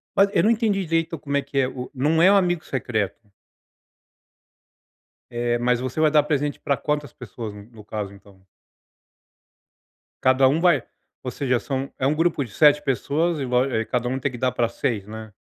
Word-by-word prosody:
Mas 195 0 +5
eu 170 - +3
não 220 - +4
entendi 215 -5 +1
direito 165 0 -1
como 140 0 -4
é - - +1
que 140 - -7
é 130 - +2
o 125 -1 -7
não 150 +5 +1
é 190 +3 +7
o - - +5
amigo 175 -4 +2
secreto. 110 -4 -3 2.0
Eh, 120 0 -1
mas 125 0 +1
você 130 +4 -4
vai 155 -1 +4
dar 150 -2 +5
presente 145 -1 -1
para 140 -2 0
quantas 150 -3 -2
pessoas, 115 -2 -8
no 105 +1 -13
caso, 105 -2 -5
então? 100 -1 -19 1.8
Cada 130 +1 +5
um 145 +5 +2
vai, 170 -8 +3 0.4
ou 125 - -4
seja, 125 -4 0
são 135 -1 -4
é 130 - +1
um 150 - +1
grupo 165 -3 +1
de 115 - -11
7 150 +2 +5
pessoas 150 +4 0
e 135 - -2
vo 125 +1 +2
e 115 -4 -1
cada 125 -1 -1
um 130 - -2
tem 135 +1 -1
que 120 - -8
dar 130 +1 0
pra 120 -1 0
6, 115 -4 -2
né? 110 0 -9
130 Hz, 195 wpm, -23 LUFS, 120-150 Hz, 2.0 s, é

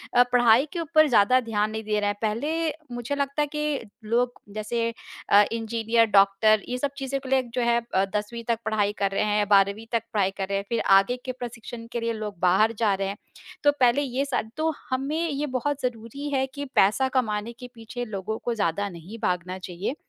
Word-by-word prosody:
अ, 245 - +8
पढ़ाई 240 +2 +5
के 345 - -3
ऊपर 310 -1 +4
ज़्यादा 245 +3 +5
ध्यान 215 -2 -1
नहीं 220 0 -4
दे 210 0 0
रहे 205 - 0
हैं। 205 - -2
पहले 300 +10 0 0.3
मुझे 240 +4 -3
लगता 280 +1 -1
है 295 - +1
कि 300 -4 -1 0.2
लोग 245 +1 0
जैसे 225 +2 -2 0.5
अ, 205 +1 +7
इंजीनियर, 230 0 +1
डॉक्टर 200 +2 +5
ये 250 - -2
सब 280 +1 -1
चीज़ें 275 0 -2
को 260 - -8
लेक 260 -2 +1
जो 250 - 0
है 235 0 +3
अ, 190 - +3
10वीं 230 +3 -3
तक 230 -1 +1
पढ़ाई 210 -2 +1
कर 195 -1 +1
रहे 195 - 0
हैं 210 0 +1
या 205 - +2
12वीं 200 +3 +3
तक 230 -2 0
पढ़ाई 195 -3 +2
कर 195 - -2
रहे 195 - 0
हैं, 200 - -4
फिर 235 - 0 0.2
आगे 245 +6 -1
के 255 - -2
प्रशिक्षण 240 -2 -8
के 235 - -2
लिए 230 0 -1
लोग 210 -4 -6
बाहर 190 +5 +4
जा 210 -3 +3
रहे 195 0 -2
हैं। 200 +1 -5 0.5
तो 290 - +6
पहले 250 +3 +4
ये 270 0 -1
सारी 245 -5 -2
तो 315 +1 +1 0.2
हमें 275 +5 -1
ये 290 +1 -2
बहुत 285 +3 -2
ज़रूरी 250 +4 -4
है 265 -1 +1
कि 285 +1 -5
पैसा 215 +7 +4
कमाने 215 -1 -1
के 250 - -8
पीछे 235 +2 -6
लोगों 215 +1 -4
को 240 - 0
ज़्यादा 200 0 0
नहीं 180 +6 -10
भागना 180 +1 -1
चाहिए, 185 - -4
230 Hz, 220 wpm, -25 LUFS, 210-255 Hz, 0.5 s, अ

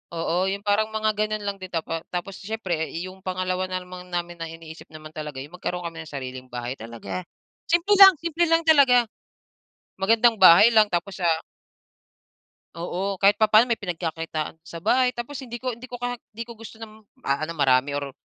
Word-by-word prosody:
oo, 175 +3 0
yung 200 +1 -5
parang 205 +1 +2
mga 215 0 +1
ganun 215 0 -1
lang 200 0 -2
din 185 - -6
tapa 165 -1 -2
tapos 180 +2 -4
siyempre 190 -6 -3
yung 185 +1 -9
pangalawa 185 0 -2
naman 180 0 -6
namin 175 0 -3
na 165 - -4
iniisip 165 0 -11
naman 155 0 -11
talaga 150 -3 -6
yung 150 +5 -12
magkaroon 180 0 -4
kami 165 -1 -8
ng - - -13
sariling 130 -2 -7
bahay 120 +1 -4
talaga. 115 +10 -6 0.5
Simple 345 +5 +3
lang, 385 -1 +11
simple 335 +1 0
lang 330 0 +3
talaga. 265 -6 +6 1.0
Magandang 225 +3 +4
bahay 185 +5 +9
lang 215 -1 +6
tapos, 175 +2 -3
ah 165 -1 +2 1.3
Oo. 185 +3 -3
Kahit 200 +1 +5
papa'no 215 +2 +5
may 235 - +1
pinagkakitaan 165 -4 -4
sa 170 -1 -9
bahay 250 +7 +2
tapos 245 +4 -7
hindi 240 -2 -7
ko 255 -2 -3
hindi 245 +2 -11
ko 245 - -6 0.3
hindi 230 +2 -6
ko 235 - -10
gusto 225 0 -12
ng 220 -1 -11 0.2
ano 155 +4 -1
marami 140 -3 +2
or 140 -1 -4
185 Hz, 175 wpm, -24 LUFS, 165-220 Hz, 1.3 s, lang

